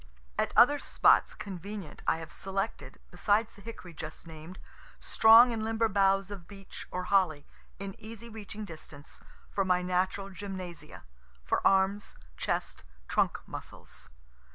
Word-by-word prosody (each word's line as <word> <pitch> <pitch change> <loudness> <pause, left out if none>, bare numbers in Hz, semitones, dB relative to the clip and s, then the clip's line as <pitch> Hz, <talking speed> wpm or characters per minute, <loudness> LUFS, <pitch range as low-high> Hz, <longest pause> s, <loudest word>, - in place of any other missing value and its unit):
At - - 0
other 290 +5 +7
spots - - +3
convenient 200 -1 -7
I - - +3
have 165 -1 -9
selected, 195 +3 -4
besides 215 +1 +1
the 200 - -16
hickory 200 -5 -9
just 155 +2 -8
named, 160 +3 -10 0.4
strong 230 +2 +7
and 220 -1 -3
limber 225 +1 +1
boughs 195 -1 +2
of 190 -4 -8
beech 195 -1 -10
or 180 - -3
holly, 180 -7 +2 0.3
in 195 0 -6
easy 225 +1 -9
reaching 215 -1 -8
distance, 155 -4 -12 0.3
for 195 - +1
my 180 -1 +2
natural 185 +2 -1
gymnasia, 185 -5 -8 0.4
for - - 0
arms, 195 +1 +1 0.2
chest, - - -3 0.2
trunk - - +1
muscles. - - -9
195 Hz, 135 wpm, -30 LUFS, 180-215 Hz, 0.4 s, other